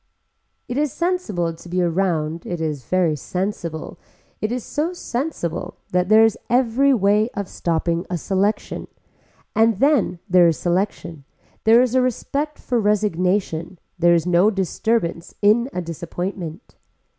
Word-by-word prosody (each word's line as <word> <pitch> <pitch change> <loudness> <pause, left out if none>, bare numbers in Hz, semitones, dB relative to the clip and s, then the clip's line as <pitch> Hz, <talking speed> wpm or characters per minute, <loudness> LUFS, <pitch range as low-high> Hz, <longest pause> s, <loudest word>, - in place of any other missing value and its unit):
It 245 +3 -2
is 295 -2 +1
sensible 235 - -1
to 170 +2 -13
be 180 +1 -1
around 170 -2 0
it 175 - -3
is 150 -6 -3
very 175 -2 +2
sensible, 170 0 -4 0.4
it 215 - -1
is 245 -1 -2
so 320 +5 -2
sensible 240 - -4 0.2
that 180 +1 +1
there 220 +1 +7
is 225 - 0
every 250 +3 +3
way 210 -1 +3
of 200 -2 -3
stopping 170 0 -1
a 180 - -1
selection, 195 +5 -1 0.7
and 225 -2 +3
then 275 - +2
there 180 -2 +6
is 165 - +1
selection, 175 -4 -2 0.4
there 230 +3 +7
is 250 -2 -1
a 260 - +4
respect 280 +4 -2
for 245 -2 -1
resignation, 185 -4 0 0.2
there 170 0 +5
is 170 - +1
no 180 +3 +4
disturbance 190 -2 -1
in 220 +5 +3
a 180 - -3
disappointment. 170 +2 -6
190 Hz, 145 wpm, -21 LUFS, 170-230 Hz, 0.7 s, there